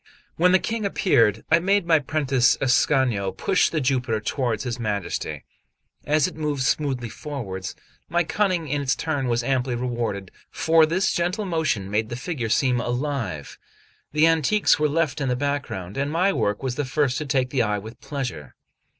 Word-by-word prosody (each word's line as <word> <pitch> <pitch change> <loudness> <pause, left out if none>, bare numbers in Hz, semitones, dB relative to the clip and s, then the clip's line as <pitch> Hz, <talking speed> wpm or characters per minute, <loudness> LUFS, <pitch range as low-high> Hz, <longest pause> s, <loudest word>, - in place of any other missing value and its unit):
When 180 +2 +4
the 185 - +6
King 225 +3 -3
appeared, 120 - +2
I 165 - +6
made 195 +1 +2
my 165 -2 +4
prentice 135 -4 +2
Ascanio 125 -6 +2
push 180 - +1
the 160 - -1
Jupiter 125 -4 0
toward 115 -1 -2
his 125 -1 -4
Majesty. 105 -5 -3 0.6
As 150 0 +3
it - - -8
moved 150 -4 -2
smoothly 130 -3 0
forwards, 105 - -6 0.3
my 175 0 +2
cunning 180 -2 0
in 145 +1 -1
its 135 0 +1
turn 145 -5 -2
was 120 0 0
amply 125 -1 0
rewarded, 120 -6 -3 0.2
for 160 -1 +3
this 185 +4 +1
gentle 180 +5 -1
motion 160 - -1
made 110 +1 0
the 120 - -4
figure 125 -3 -4
seem 125 +1 +2
alive; 120 - -3 0.5
the 150 +2 +4
antiques 165 +5 +3
were 150 0 +2
left 150 -2 0
in 135 - 0
the 125 - +1
background, 140 -9 -3
and 140 +1 -1
my 185 +5 +2
work 105 - -1
was 130 -1 -2
the 145 - 0
first 135 0 0
to 150 - -4
take 130 -2 0
the 130 - +1
eye 105 -2 +1
with 110 +3 -10
pleasure. 125 - -5
135 Hz, 175 wpm, -24 LUFS, 120-155 Hz, 0.6 s, the